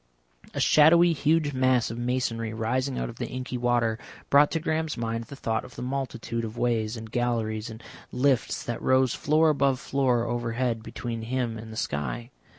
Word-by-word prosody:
A -, -, -1 dB
shadowy, 170 Hz, +3 st, +6 dB
huge 155 Hz, -1 st, +1 dB
mass 130 Hz, -3 st, +2 dB
of 115 Hz, -, -6 dB
masonry 120 Hz, -2 st, -1 dB
rising 130 Hz, +4 st, -1 dB
out -, -, -2 dB
of 115 Hz, -, -9 dB
the 120 Hz, -, -3 dB
inky 130 Hz, +1 st, -5 dB
water, 120 Hz, -2 st, +1 dB, 0.3 s
brought 145 Hz, +1 st, +6 dB
to 165 Hz, -, -1 dB
Graham's 160 Hz, -1 st, -1 dB
mind 115 Hz, 0 st, -2 dB
the 140 Hz, -, -10 dB
thought 115 Hz, -4 st, -2 dB
of 125 Hz, -, -13 dB
the -, -, -6 dB
multitude 125 Hz, -3 st, -3 dB
of 110 Hz, +1 st, -6 dB
ways 115 Hz, -2 st, 0 dB
and 110 Hz, -1 st, -9 dB
galleries 115 Hz, -2 st, -1 dB
and 110 Hz, +1 st, -10 dB, 0.3 s
lifts 130 Hz, -1 st, +1 dB
that 120 Hz, -, -4 dB
rose 130 Hz, -1 st, +3 dB
floor 155 Hz, +2 st, +3 dB
above 140 Hz, -3 st, +1 dB
floor 130 Hz, -4 st, +1 dB
overhead 120 Hz, 0 st, -1 dB
between 115 Hz, +1 st, -5 dB
him 120 Hz, 0 st, -2 dB
and 110 Hz, 0 st, -8 dB
the 110 Hz, -, -8 dB
sky. 75 Hz, -, -3 dB
120 Hz, 180 wpm, -27 LUFS, 115-135 Hz, 0.3 s, shadowy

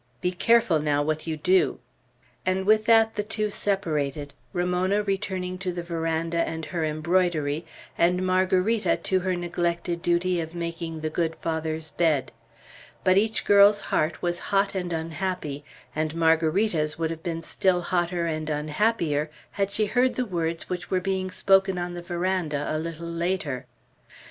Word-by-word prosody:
Be 180 Hz, -, 0 dB
careful, 185 Hz, -2 st, +3 dB
now, 145 Hz, -1 st, +1 dB
what 155 Hz, +2 st, -2 dB
you 160 Hz, -1 st, -2 dB
do." 185 Hz, +4 st, +2 dB, 0.7 s
And 185 Hz, +1 st, 0 dB
with 215 Hz, +1 st, +4 dB
that 225 Hz, -1 st, +5 dB
the 210 Hz, -, -1 dB
two 215 Hz, 0 st, -2 dB
separated, 150 Hz, -9 st, -1 dB, 0.2 s
Ramona 180 Hz, +3 st, +1 dB
returning 185 Hz, -2 st, -2 dB
to 185 Hz, 0 st, -2 dB
the 175 Hz, -1 st, -5 dB
veranda 165 Hz, 0 st, -1 dB
and 160 Hz, -1 st, -2 dB
her 170 Hz, -3 st, -3 dB
embroidery, 155 Hz, -1 st, 0 dB, 0.3 s
and 180 Hz, +2 st, +3 dB
Margarita 185 Hz, +4 st, +2 dB
to 190 Hz, -, 0 dB
her 185 Hz, 0 st, -1 dB
neglected 175 Hz, 0 st, -2 dB
duty 175 Hz, 0 st, +1 dB
of 160 Hz, +1 st, -7 dB
making 170 Hz, -1 st, -4 dB
the 155 Hz, 0 st, -2 dB
good 165 Hz, 0 st, -1 dB
Father's 160 Hz, -1 st, -3 dB
bed. 155 Hz, -5 st, +1 dB, 0.7 s
But 185 Hz, +1 st, +5 dB
each 220 Hz, +1 st, 0 dB
girl's 205 Hz, 0 st, +7 dB
heart 155 Hz, +2 st, 0 dB
was 175 Hz, 0 st, 0 dB
hot 200 Hz, 0 st, +2 dB
and 180 Hz, -2 st, -3 dB
unhappy; 165 Hz, -2 st, -3 dB, 0.3 s
and 155 Hz, 0 st, -1 dB
Margarita's 160 Hz, 0 st, +2 dB
would 165 Hz, -1 st, -1 dB
have 165 Hz, -1 st, -6 dB
been 165 Hz, -1 st, -4 dB
still 180 Hz, +1 st, +1 dB
hotter 175 Hz, -1 st, 0 dB
and 155 Hz, -1 st, -2 dB
unhappier, 150 Hz, 0 st, 0 dB, 0.2 s
had 200 Hz, -1 st, -1 dB
she 215 Hz, +1 st, +1 dB
heard 250 Hz, +4 st, +2 dB
the 255 Hz, -, 0 dB
words 170 Hz, -4 st, -2 dB
which 180 Hz, -1 st, -4 dB
were 185 Hz, -, +2 dB
being 185 Hz, 0 st, -2 dB
spoken 195 Hz, 0 st, +3 dB
on 175 Hz, 0 st, -3 dB
the 175 Hz, -, -6 dB
veranda 175 Hz, -4 st, -1 dB
a -, -, 0 dB
little 165 Hz, +1 st, -5 dB
later. 170 Hz, -6 st, -2 dB
175 Hz, 160 wpm, -26 LUFS, 160-190 Hz, 0.7 s, girl's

